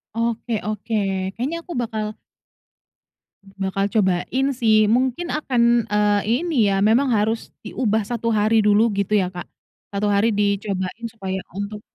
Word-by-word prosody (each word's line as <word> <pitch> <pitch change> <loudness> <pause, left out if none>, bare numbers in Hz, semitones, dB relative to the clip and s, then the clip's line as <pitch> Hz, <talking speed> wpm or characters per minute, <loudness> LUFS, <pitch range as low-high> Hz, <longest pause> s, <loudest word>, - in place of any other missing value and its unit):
Oke 230 +1 -2 0.2
oke 215 +1 -5 0.4
kayaknya 275 +9 -2
aku 350 - -11
bakal 215 -2 -3 1.3
bakal 195 0 -2
cobain 210 +5 +1 0.2
sih 215 -1 +5
mungkin 260 +7 0
akan, 265 -5 0 0.3
eee, 210 0 +2 0.3
ini 245 -12 +2
ya 195 - +1
memang 250 +5 +3
harus 220 0 0 0.2
diubah 220 -1 0
1 230 0 -2
hari 215 0 +3
dulu 210 +1 +4 0.2
gitu 205 +1 +1
ya 185 -1 0
Kak, 175 - -8 0.4
1 200 +1 -1
hari 210 +3 +3
dicobain 200 0 -1
supaya 190 -4 -5 0.2
untuk, 205 +1 -5
215 Hz, 135 wpm, -22 LUFS, 200-230 Hz, 1.3 s, sih